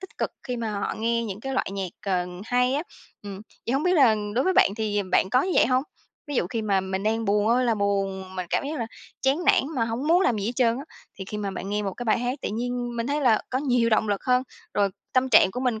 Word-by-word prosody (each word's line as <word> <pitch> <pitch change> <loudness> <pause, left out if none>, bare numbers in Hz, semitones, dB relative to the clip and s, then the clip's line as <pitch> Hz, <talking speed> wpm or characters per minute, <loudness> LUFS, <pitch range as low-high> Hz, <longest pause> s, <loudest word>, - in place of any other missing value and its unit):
tích 380 - -12
cực - - -1
khi 250 -2 -4
mà 225 -2 -3
họ 200 -1 -2
nghe 230 +1 0
những 205 -1 -6
cái 270 +1 -4
loại 230 - -1
nhạc, 195 -3 -3 0.2
ờ, 180 -2 +1 0.2
hay 250 +2 +2
á, 290 - 0 0.4
ừm, 200 -1 -7 0.3
vậy 235 - 0
hông 270 +2 +1
biết 360 +2 +2
là 255 -9 +5 0.2
đối 255 - +2
với 375 - +3
bạn 200 - +5
thì 210 -2 0
bạn 190 - +3
có 255 +4 +4
như 370 - -1
vậy - - +5
hông? 255 0 +2 0.4
Ví 290 - -5
dụ 175 - +1
khi 225 +4 -3
mà 200 -2 +2
mình 190 0 -3
đang 225 +2 0
buồn 205 +1 +2
ơi 250 +2 +3
là 235 -2 +2
buồn, 195 -2 -2
mình 185 -1 -3
cảm - - 0
giác 300 +1 -3
là 230 - -2 0.4
chán 275 +6 +1
nản - - +5
mà 230 - +2
hổng 230 +6 -3
muốn 345 +3 +5
làm 245 -11 +2
gì 200 - -2
hết 235 - -1
trơn 235 -2 +3
á, 280 - -7 0.3
thì 190 - -5
khi 210 +2 -6
mà 200 -1 -2
bạn 195 - -6
nghe 210 0 0
một 195 -2 -2
cái 245 - -6
bài 220 - +2
hát 245 +3 -2
tự - - -1
nhiên 245 +1 -3
mình 230 +1 -2
thấy 290 +1 0
là 235 -5 +4
có 255 - 0
nhiều 245 -4 +2
động 220 0 +2
lực 205 -1 -1
hơn, 250 0 +3 0.3
rồi 200 -1 +3 0.2
tâm 260 0 +2
trạng 195 - +6
của 250 - -5
mình 245 -4 0
230 Hz, 285 wpm, -25 LUFS, 205-255 Hz, 0.4 s, trạng